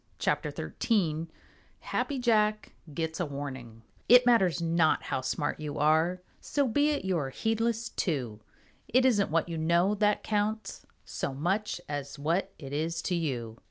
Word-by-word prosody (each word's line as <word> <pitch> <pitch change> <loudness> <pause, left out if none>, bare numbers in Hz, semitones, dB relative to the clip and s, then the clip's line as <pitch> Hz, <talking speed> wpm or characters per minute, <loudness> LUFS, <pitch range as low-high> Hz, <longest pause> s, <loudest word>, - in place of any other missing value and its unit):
CHAPTER - - 0 0.3
XIII 165 -8 +1 0.5
HAPPY 285 - -2
JACK 215 -4 +2 0.2
GETS 160 +3 -3
A 175 - 0
WARNING 130 -5 -7 0.3
It 250 +1 +8
matters 195 -9 +4
not 165 -1 +2
how 135 - -2
smart 130 +3 -2
you 150 -1 -5
are, 160 +5 +2 0.2
So 285 -2 0
be 290 +6 +2
it 290 -9 -1
you 185 -3 +1
are 135 -3 -3
heedless 225 - -1
too. 125 - -2 0.5
It 255 +2 +3
isn't 210 -6 +3
what 165 +2 +1
you 165 -2 -4
know 170 +5 +3
that 210 0 +1
counts 215 +1 -2 0.2
So 135 - -4
much 190 +8 -1
as 145 -1 -5
what 165 +7 0
it 140 -2 -8
is 165 +3 -2
to 185 - -1
you. 125 -9 -3
170 Hz, 160 wpm, -29 LUFS, 145-215 Hz, 0.5 s, It